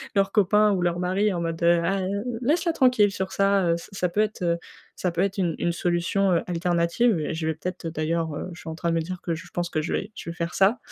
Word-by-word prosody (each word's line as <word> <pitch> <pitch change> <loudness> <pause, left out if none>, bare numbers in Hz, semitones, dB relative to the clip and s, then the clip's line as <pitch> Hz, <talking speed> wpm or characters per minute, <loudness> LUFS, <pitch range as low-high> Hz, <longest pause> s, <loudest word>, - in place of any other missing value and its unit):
leurs 195 0 +2
copains 210 +1 +4
ou 190 -3 0
leurs 175 0 0
maris 190 +3 +1
en 175 - -2
mode: 165 0 -3
«Ah, 170 +3 +3 0.4
laisse-la 325 +7 +2
tranquille 250 -8 +4
sur 190 -1 -3
ça», 195 -3 +2
ça 170 - -10
ça 180 -2 0
peut 205 +5 +1
être 215 -3 -2
heu, 170 -1 +2 0.4
ça 180 - -1
peut 170 +1 -1
être 195 +1 0
une 170 -4 0
une 170 - 0
solution, 175 +3 +1
heu, 170 - +2
alternative 175 +4 +1
et 155 - -2
je 160 0 -3
vais 160 - 0
peut-être, 180 +2 -5
d'ailleurs 160 0 -1
heu, - - -4
je 170 - -11
suis - - -8
en 160 - -5
train 170 +1 -2
de - - +1
me 165 - +1
dire 180 +2 -6
que 170 - -1
j 165 - -5
je - - -17
pense 175 0 -3
que 155 - 0
je 160 - -4
vais 210 - -2
je - - -7
vais 170 - -6
faire 170 0 -3
ça. 200 +5 +4
175 Hz, 270 wpm, -25 LUFS, 170-195 Hz, 0.4 s, copains